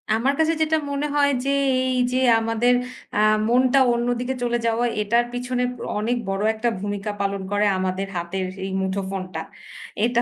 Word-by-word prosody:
আমার 255 Hz, +5 st, +1 dB
কাছে 320 Hz, +1 st, +3 dB
যেটা 315 Hz, 0 st, +2 dB
মনে 280 Hz, +1 st, -1 dB
হয় 285 Hz, -1 st, +4 dB
যে, -, -, 0 dB, 0.4 s
এই 255 Hz, -, 0 dB, 0.2 s
যে 255 Hz, -, +2 dB, 0.2 s
আমাদের 225 Hz, +2 st, +2 dB, 0.4 s
আ -, -, +2 dB, 0.3 s
মনটা 255 Hz, +2 st, +4 dB
অন্যদিকে 245 Hz, +2 st, -1 dB
চলে 240 Hz, 0 st, +1 dB
যাওয়া, 230 Hz, +1 st, +1 dB, 0.2 s
এটার 235 Hz, +3 st, +2 dB
পিছনে 250 Hz, 0 st, -2 dB, 0.4 s
অনেক 235 Hz, +3 st, 0 dB
বড় 195 Hz, +1 st, -1 dB
একটা 230 Hz, +2 st, 0 dB
ভূমিকা 205 Hz, +1 st, -3 dB
পালন 200 Hz, 0 st, -1 dB
করে 205 Hz, +1 st, +2 dB
আমাদের 185 Hz, +1 st, -2 dB
হাতের 185 Hz, +2 st, -3 dB, 0.2 s
এই 195 Hz, -, -4 dB
মুঠোফোনটা। 190 Hz, -1 st, -3 dB, 0.6 s
এটা 240 Hz, 0 st, +2 dB
235 Hz, 160 wpm, -23 LUFS, 200-250 Hz, 0.6 s, হয়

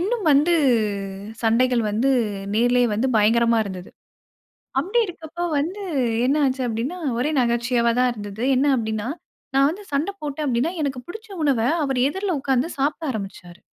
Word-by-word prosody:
இன்னும் 425 Hz, +3 st, -1 dB
வந்து 300 Hz, +5 st, +4 dB, 0.9 s
சண்டைகள் 235 Hz, +1 st, +3 dB
வந்து 230 Hz, +6 st, +1 dB, 0.4 s
நேரிலேயே 245 Hz, +2 st, +3 dB
வந்து, 235 Hz, +6 st, 0 dB
பயங்கரமா 230 Hz, +2 st, +3 dB
இருந்தது. 185 Hz, -2 st, -8 dB, 0.9 s
அப்டி 395 Hz, +10 st, +1 dB
இருக்கப்ப 335 Hz, -2 st, -9 dB, 0.2 s
வந்து 360 Hz, +8 st, -3 dB, 0.4 s
என்ன 275 Hz, +3 st, +2 dB
ஆச்சு? 260 Hz, 0 st, -1 dB
அப்டின்னா, 240 Hz, +10 st, -3 dB, 0.2 s
ஒரே 290 Hz, +6 st, 0 dB
நகைச்சுவையா 235 Hz, 0 st, +1 dB
தான் 250 Hz, 0 st, +3 dB
இருந்தது. 205 Hz, 0 st, -7 dB
என்ன 270 Hz, +3 st, +2 dB
அப்டின்னா, 220 Hz, 0 st, -3 dB, 0.5 s
நான் 275 Hz, +1 st, +5 dB
வந்து 400 Hz, +6 st, -8 dB
சண்ட 285 Hz, +7 st, 0 dB
போட்டேன் 295 Hz, 0 st, -3 dB
அப்டின்னா, 255 Hz, +7 st, 0 dB
எனக்கு 270 Hz, -3 st, -2 dB
புடிச்ச 440 Hz, +4 st, -9 dB, 0.2 s
உணவ 275 Hz, -5 st, +2 dB, 0.2 s
அவர் 270 Hz, -2 st, -1 dB
எதிர்ல 385 Hz, +6 st, -3 dB
உக்காந்து 265 Hz, +1 st, +1 dB
சாப்பிட 295 Hz, +4 st, 0 dB
ஆரம்பிச்சாரு. 195 Hz, -5 st, -8 dB
255 Hz, 145 wpm, -22 LUFS, 230-305 Hz, 0.9 s, நான்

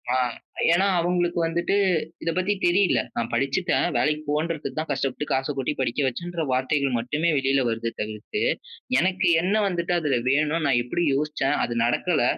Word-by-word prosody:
ஆ. -, -, +3 dB, 0.6 s
ஏனா 185 Hz, +3 st, +3 dB
அவங்களுக்கு 175 Hz, 0 st, 0 dB
வந்துட்டு 170 Hz, +4 st, 0 dB, 0.5 s
இத -, -, -1 dB
பத்தி 185 Hz, +3 st, +1 dB
தெரியல. 175 Hz, -, +3 dB, 0.2 s
நான் 115 Hz, 0 st, -2 dB
படிச்சுட்டேன். 135 Hz, +9 st, +1 dB
வேலைக்கு 150 Hz, 0 st, +1 dB
போன்றதுக்கு 155 Hz, +1 st, -1 dB
தான் 155 Hz, -, -4 dB
கஷ்டப்பட்டு 135 Hz, +1 st, -2 dB
காசை 135 Hz, +2 st, 0 dB
கொட்டி 135 Hz, +2 st, -1 dB
படிக்க 130 Hz, +1 st, -1 dB
வைச்சேன் 130 Hz, +7 st, -3 dB
என்ற 170 Hz, -2 st, -3 dB
வார்த்தைகள் 130 Hz, +1 st, +1 dB
மட்டுமே 150 Hz, +8 st, 0 dB
வெளில 135 Hz, 0 st, +2 dB
வருது 115 Hz, 0 st, -2 dB
தவிர்த்து. 110 Hz, -, -4 dB, 0.6 s
எனக்கு 185 Hz, +1 st, +1 dB
என்ன 190 Hz, +4 st, +1 dB
வந்துட்டு 175 Hz, -2 st, -1 dB
''அதுல 150 Hz, -6 st, +1 dB
வேணும் 155 Hz, +4 st, +1 dB
நான் 130 Hz, -3 st, +3 dB
எப்டி 125 Hz, +8 st, -2 dB
யோசிச்சேன் 145 Hz, -1 st, 0 dB
அது 120 Hz, -, -2 dB
நடக்கல 155 Hz, +7 st, +1 dB
150 Hz, 160 wpm, -24 LUFS, 130-175 Hz, 0.6 s, ஆ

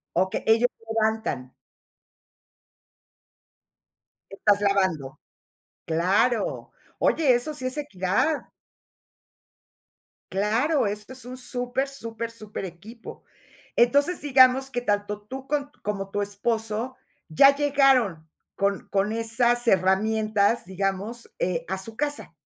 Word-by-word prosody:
Okey 185 Hz, +2 st, 0 dB
ellos 225 Hz, +2 st, +4 dB
se 225 Hz, -, -23 dB
levantan. 220 Hz, -, -1 dB, 2.8 s
Estás 205 Hz, +1 st, +2 dB
lavando, 185 Hz, -8 st, 0 dB, 0.7 s
claro. 200 Hz, +8 st, +1 dB, 0.3 s
Oye, 290 Hz, -6 st, +3 dB
eso 245 Hz, +6 st, +1 dB
sí 285 Hz, -3 st, -4 dB
es 255 Hz, -, -4 dB
equidad. 265 Hz, -, 0 dB, 1.9 s
Claro, 225 Hz, -, +1 dB
esto 210 Hz, +4 st, -4 dB
es 255 Hz, -2 st, -8 dB
un 255 Hz, +1 st, -8 dB
super, 250 Hz, +2 st, -2 dB
super, 230 Hz, -4 st, -6 dB
superequipo. 215 Hz, -1 st, -9 dB, 0.5 s
Entonces, 285 Hz, +8 st, +3 dB
digamos 265 Hz, -1 st, +5 dB
que 245 Hz, -2 st, -3 dB
tanto 205 Hz, -2 st, -1 dB
tú 265 Hz, +5 st, -9 dB
con 290 Hz, -1 st, -2 dB
como 195 Hz, -2 st, -4 dB
tu 205 Hz, -, -1 dB
esposo 220 Hz, +4 st, -2 dB, 0.3 s
ya 275 Hz, -, +6 dB
llegaron 270 Hz, -, +2 dB, 0.3 s
con 200 Hz, -1 st, -1 dB
con 200 Hz, +2 st, +1 dB
esas 235 Hz, +2 st, +1 dB
herramientas, 215 Hz, +3 st, +2 dB
digamos, 195 Hz, +5 st, -3 dB
eh, 170 Hz, -2 st, -1 dB
a 190 Hz, -, -2 dB
su 220 Hz, +4 st, -5 dB
casa. 290 Hz, -7 st, -2 dB
225 Hz, 105 wpm, -25 LUFS, 200-255 Hz, 2.8 s, ya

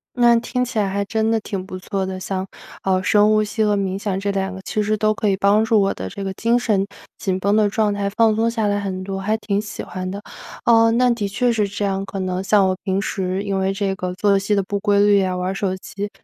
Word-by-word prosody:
那 240 Hz, -1 st, +5 dB
听 250 Hz, +1 st, -1 dB
起 245 Hz, -2 st, -4 dB
来 205 Hz, -2 st, +2 dB
还 200 Hz, +1 st, -1 dB
真 220 Hz, +2 st, 0 dB
的 225 Hz, -, +2 dB
挺 195 Hz, -3 st, -5 dB
不 185 Hz, 0 st, -7 dB
错 190 Hz, +1 st, -3 dB
的。 190 Hz, 0 st, -4 dB
像， 185 Hz, 0 st, -3 dB, 0.4 s
呃， 190 Hz, -1 st, +1 dB
深 210 Hz, +2 st, +4 dB
呼 215 Hz, 0 st, +3 dB
吸 215 Hz, +1 st, -2 dB
和 210 Hz, -1 st, +2 dB
冥 195 Hz, -1 st, -1 dB
想 200 Hz, -2 st, -2 dB
这 200 Hz, +1 st, -1 dB
2 195 Hz, -1 st, -2 dB
个 190 Hz, -, -8 dB
其 215 Hz, -, -1 dB
实 215 Hz, +1 st, 0 dB
都 215 Hz, 0 st, +1 dB
可 215 Hz, -1 st, -1 dB
以 195 Hz, -, +2 dB
帮 200 Hz, +2 st, +3 dB
助 220 Hz, -1 st, +3 dB
我 195 Hz, 0 st, +1 dB
的 95 Hz, -, -5 dB
这 195 Hz, -, -6 dB
个 195 Hz, -, -3 dB
精 230 Hz, +4 st, +2 dB
神 210 Hz, -5 st, +1 dB, 0.3 s
紧 185 Hz, -2 st, -2 dB
绷 200 Hz, +2 st, +1 dB
的 215 Hz, -1 st, +4 dB
状 210 Hz, -1 st, +1 dB
态 200 Hz, 0 st, -1 dB
放 220 Hz, +1 st, +3 dB
松 225 Hz, +2 st, +1 dB
下 225 Hz, -2 st, -1 dB
来 205 Hz, 0 st, +1 dB
很 190 Hz, -2 st, -4 dB
多， 195 Hz, 0 st, -4 dB
还 215 Hz, +3 st, 0 dB
挺 205 Hz, -2 st, -1 dB
喜 210 Hz, -1 st, -6 dB
欢 185 Hz, 0 st, -5 dB
的。 200 Hz, +2 st, -5 dB, 0.4 s
嗯， 230 Hz, -1 st, +5 dB
那 250 Hz, -, +4 dB
的 225 Hz, -4 st, -1 dB
确 240 Hz, +5 st, +1 dB
是 215 Hz, -3 st, +1 dB
这 205 Hz, +1 st, -3 dB
样， 195 Hz, 0 st, -1 dB
可 195 Hz, -, -6 dB
能 185 Hz, 0 st, -2 dB
像 195 Hz, 0 st, +4 dB
我 185 Hz, -, 0 dB
平 190 Hz, 0 st, 0 dB
时 190 Hz, -2 st, -2 dB
因 195 Hz, -1 st, -1 dB
为 190 Hz, 0 st, +1 dB
这 195 Hz, -1 st, -1 dB
个 180 Hz, -1 st, -4 dB
作 200 Hz, +1 st, +2 dB
息 200 Hz, +2 st, 0 dB
的 200 Hz, -, +2 dB
不 200 Hz, +1 st, -3 dB
规 205 Hz, -1 st, +2 dB
律 205 Hz, 0 st, +5 dB
呀， 185 Hz, -1 st, -1 dB
玩 180 Hz, +1 st, -2 dB
儿 -, -, -3 dB
手 195 Hz, -1 st, -1 dB
机， 200 Hz, +2 st, -6 dB
200 Hz, 290 characters per minute, -21 LUFS, 190-215 Hz, 0.4 s, 那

